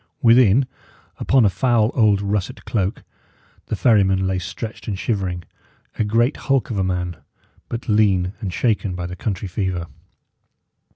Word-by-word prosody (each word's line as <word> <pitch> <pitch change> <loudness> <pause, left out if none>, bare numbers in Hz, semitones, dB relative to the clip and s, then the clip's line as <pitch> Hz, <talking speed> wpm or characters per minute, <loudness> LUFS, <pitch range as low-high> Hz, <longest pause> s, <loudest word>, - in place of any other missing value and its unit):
Within, 120 +1 +6 0.5
upon 130 -4 +3
a - - +5
foul 115 +3 +2
old 105 -4 +3
russet 100 -1 -2
cloak, 100 -3 -2 0.6
the - - -2
ferryman 95 -5 +3
lay 95 0 0
stretched 105 +3 -7
and 100 -3 -2
shivering; 95 -5 -2 0.6
a - - +3
great 115 +6 +1
hulk 135 -3 0
of 105 - -1
a - - +1
man, 90 -2 -2 0.5
but 115 +1 -5
lean 100 -4 +2
and 100 -5 -4
shaken 105 -2 0
by 90 -1 -4
the 90 +1 -6
country 100 -1 -3
fever. 90 -2 -2
100 Hz, 150 wpm, -21 LUFS, 95-115 Hz, 0.6 s, Within